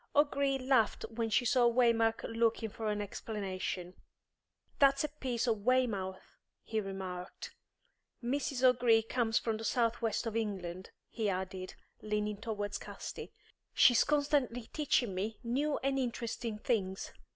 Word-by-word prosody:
O'Gree 280 -2 +3
laughed 255 -4 +2
when 225 0 -2
he 245 +3 +2
saw 240 -2 +4
Waymark 230 -2 +3
looking 230 0 0
for 220 +1 -5
an 210 0 -1
explanation. 190 -3 -4 0.9
"That's 275 0 +5
a 300 - -1
piece 255 -5 -2
of 220 -4 0
Weymouth," 215 -7 0 0.2
he 220 -1 -1
remarked. 190 -2 -6 0.7
"Mrs. 265 +1 -1
O'Gree 240 -3 +5
comes 225 -1 +1
from 225 -2 0
the 225 - -7
south 230 0 +1
west 225 0 0
of 225 -1 -3
England," 190 -5 -3 0.2
he 220 -3 -1
added, 185 0 -4 0.3
leaning 210 -1 -1
towards 205 -2 -3
Casti. - - -7 0.4
"She's 245 -2 +6
constantly 285 -5 0
teaching 255 -8 +1
me 205 +4 -3
new 280 +5 0
and 270 0 +1
interesting 235 -2 -3
things. 200 -5 -1
225 Hz, 135 wpm, -33 LUFS, 205-250 Hz, 0.9 s, She's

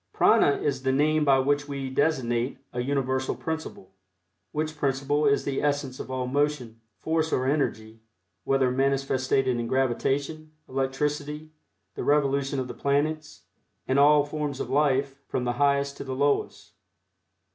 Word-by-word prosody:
Prana 145 - +4
is 135 -3 -2
the 130 0 +1
name 150 +3 +2
by 140 -2 +5
which 145 +2 +1
we 140 -2 -4
designate 130 -4 0 0.2
a 125 - -2
universal 130 0 -1
principle, 160 - -6 0.6
which 155 +1 -3
principle 145 +1 0
is 140 0 +2
the 140 -1 -2
essence 145 -3 -1
of - - -7
all 130 -1 -2
motion, 130 -4 -1 0.2
force 160 0 -1
or 130 - +1
energy, 115 -6 -1 0.4
whether 135 -2 +2
manifested 135 0 +1
in 120 -2 0
gravitation, 140 +5 -1
electricity, 150 +3 -2 0.4
the - - -5
revolution 140 -1 +1
of 130 - -3
the - - -6
planets, 150 +2 -1 0.4
and 130 +1 +2
all 145 0 +6
forms 145 -2 -4
of - - -4
life, 140 -1 +1
from 125 - -2
the 120 0 -1
highest 140 0 +2
to - - -6
the 130 -1 -5
lowest. 140 +1 -1
140 Hz, 145 wpm, -26 LUFS, 130-145 Hz, 0.6 s, all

